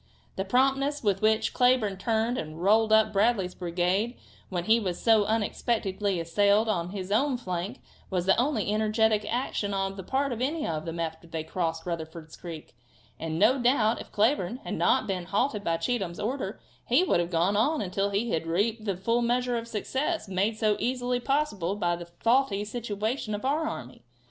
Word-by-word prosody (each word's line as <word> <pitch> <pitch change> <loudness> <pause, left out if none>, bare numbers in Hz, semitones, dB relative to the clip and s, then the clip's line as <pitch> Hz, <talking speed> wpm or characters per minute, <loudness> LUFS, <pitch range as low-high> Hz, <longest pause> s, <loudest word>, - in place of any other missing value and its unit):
The 190 - -2
promptness 270 +6 +1
with 200 -3 +1
which 220 0 +2
Cleburne 245 -6 +3
turned 225 +4 0
and 155 0 -6
rolled 215 +4 +3
up 220 0 +4
Bradley's 200 -3 +2
brigade 180 +6 -1 0.3
when 180 -2 -2
he 225 +5 +4
was 185 -5 -3
so 220 -3 +4
unexpectedly 205 -3 -1
assailed 200 +6 +3
on 175 -5 -1
his 190 0 -6
own 260 +5 +2
flank, 185 +1 -4 0.3
was 180 -2 -1
the 190 - +5
only 240 -5 0
energetic 215 0 +2
action 220 -5 -1
on 195 0 -2
the 190 - -6
part 270 +6 0
of 235 - -5
any 300 +5 -1
of 155 -1 -3
them 165 0 -5
after 160 0 -4
they 160 -1 -4
had 160 - -19
crossed 165 -3 -2
Rutherford's 160 -2 -6
creek; 160 -7 -9 0.4
and, 160 -1 -3
no 255 +8 +4
doubt, 240 -3 +3
if - - -12
Cleburne 220 -1 +1
had - - -4
not - - +2
been 185 -3 -3
halted 205 +3 0
by 165 -2 0
Cheatham's 185 -1 -2
order, 245 +7 -3 0.3
he - - +4
would 350 - +2
have 170 0 -1
gone 175 +4 +1
on 290 +9 +2
until 195 +1 -1
he 210 +3 -1
had 165 0 -1
reaped 215 +6 0
the 195 -4 -1
full 230 +6 +1
measure 245 +1 +1
of 230 0 -3
success 265 +7 -2
made 195 +4 0
so 215 -2 +2
easily 250 0 0
possible 240 - 0
by 175 -4 0
the 170 0 -8
faulty 220 +3 +1
situation 215 0 -3
of 210 - -6
our 305 +4 +1
army. 125 - -7
210 Hz, 190 wpm, -27 LUFS, 180-240 Hz, 0.4 s, the